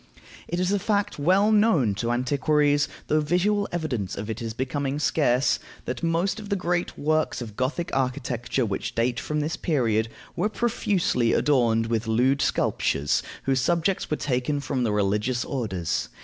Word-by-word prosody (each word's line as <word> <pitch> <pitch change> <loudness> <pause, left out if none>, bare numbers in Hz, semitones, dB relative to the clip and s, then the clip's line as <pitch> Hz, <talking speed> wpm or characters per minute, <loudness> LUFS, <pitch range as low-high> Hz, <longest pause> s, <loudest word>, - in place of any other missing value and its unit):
It 175 - -2
is 185 +1 +1
a 205 - +2
fact 200 -4 -1
well 190 +8 +4
known 205 - +4
to 120 - 0
antiquaries, 145 +3 +2 0.2
though 155 - +2
visual 200 +6 +1
evidence 130 - -3
of 105 +3 -4
it 110 - -6
is 115 -1 -4
becoming 135 +2 -2
scarce, 140 -3 +2 0.3
that 125 -1 -4
most 170 +5 0
of 210 -2 -9
the 200 - +1
great 180 -2 -1
works 155 +2 0
of 110 -4 -7
Gothic 140 +8 -2
architecture 130 -1 -1
which 100 -3 -3
date 120 +2 +1
from 150 +1 -2
this 155 +3 -2
period 115 -8 0 0.3
were 210 - 0
profusely 200 - +1
adorned 115 -6 +3
with 115 0 -1
lewd 130 +5 +2
sculptures 75 +1 +1 0.2
whose 135 -1 +1
subjects 170 +6 0
were 150 - 0
taken 135 +2 -1
from 135 -2 -2
the 115 - +1
religious 105 +5 0
orders. 100 - -2
140 Hz, 165 wpm, -25 LUFS, 120-170 Hz, 0.3 s, well